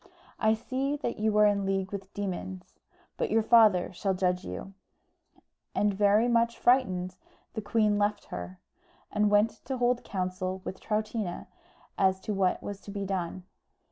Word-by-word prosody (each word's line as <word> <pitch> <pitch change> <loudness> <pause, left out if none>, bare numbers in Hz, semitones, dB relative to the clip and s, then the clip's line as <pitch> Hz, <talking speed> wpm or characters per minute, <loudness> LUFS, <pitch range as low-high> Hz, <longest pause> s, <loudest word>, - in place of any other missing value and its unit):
"I 220 0 +3
see 265 +5 -2
that 240 -6 -4
you 215 0 +1
are 210 - +7
in 205 -1 +2
league 195 -1 -1
with 195 -1 -6
demons; 135 - -5 0.4
but - - -1
your 225 0 +3
father 215 -6 +5
shall 190 +1 -1
judge 180 0 0
you;" 195 - -7 1.0
and, 205 0 +2
very 205 +3 +4
much 235 -1 +2
frightened, 185 -8 +2 0.4
the 220 - -3
queen 210 0 +2
left 205 0 0
her, 90 +1 -6 0.5
and 210 0 +2
went 210 +2 +2
to 265 - -3
hold 245 0 +1
counsel 185 0 -3
with 190 - -5
Troutina 215 -3 -2 0.5
as 190 -1 +3
to 210 - -3
what 190 -2 +1
was 200 -1 -6
to - - -12
be 200 0 -4
done. 185 -1 -3
205 Hz, 160 wpm, -29 LUFS, 185-220 Hz, 1.0 s, are